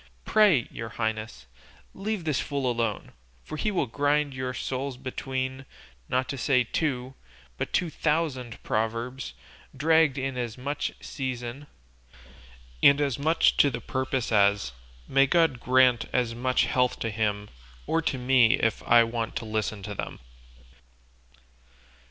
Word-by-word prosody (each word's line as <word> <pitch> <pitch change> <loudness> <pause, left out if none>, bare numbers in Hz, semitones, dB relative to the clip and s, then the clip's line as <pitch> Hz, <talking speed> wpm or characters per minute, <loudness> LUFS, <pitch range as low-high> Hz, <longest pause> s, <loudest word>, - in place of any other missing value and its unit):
Pray, 200 - +4
your 115 - -6
highnesses, 110 - -4 0.5
leave 205 -1 -3
this 150 -7 0
fool 140 -2 -2
alone, 115 -4 -1 0.3
for - - -7
he 215 - -1
will 190 -4 0
grind 145 +3 +1
your 130 0 -3
souls 130 +1 -4
between, 130 0 -4 0.5
not 130 +1 0
to 140 - -5
say 125 0 +3
two, 130 0 -2 0.4
but - - -4
two 175 -3 0
thousand 150 -8 -1
proverbs, 115 - -2 0.4
dragged 160 -1 +3
in 130 -1 -2
as 120 -1 -4
much 140 +3 -2
in - - -17
season, 130 +1 -5 1.1
and 140 +1 +7
as 140 -4 0
much 160 +3 +3
to 145 - +6
the 130 - -4
purpose 130 -2 -2
as 100 - +3 0.4
may 135 +1 +4
God 160 -5 +3
grant 125 -1 +4
as 120 -2 0
much 125 +2 +1
health 125 -1 +1
to 115 - -1
him, 105 -1 -1 0.4
or 165 - +1
to 145 - -1
me 125 -1 +4
if 115 -5 0
I 120 0 +6
want 115 0 -3
to 130 -3 -3
listen 110 -1 -2
to 105 +1 -5
them!" - - -5
130 Hz, 145 wpm, -27 LUFS, 115-140 Hz, 1.1 s, and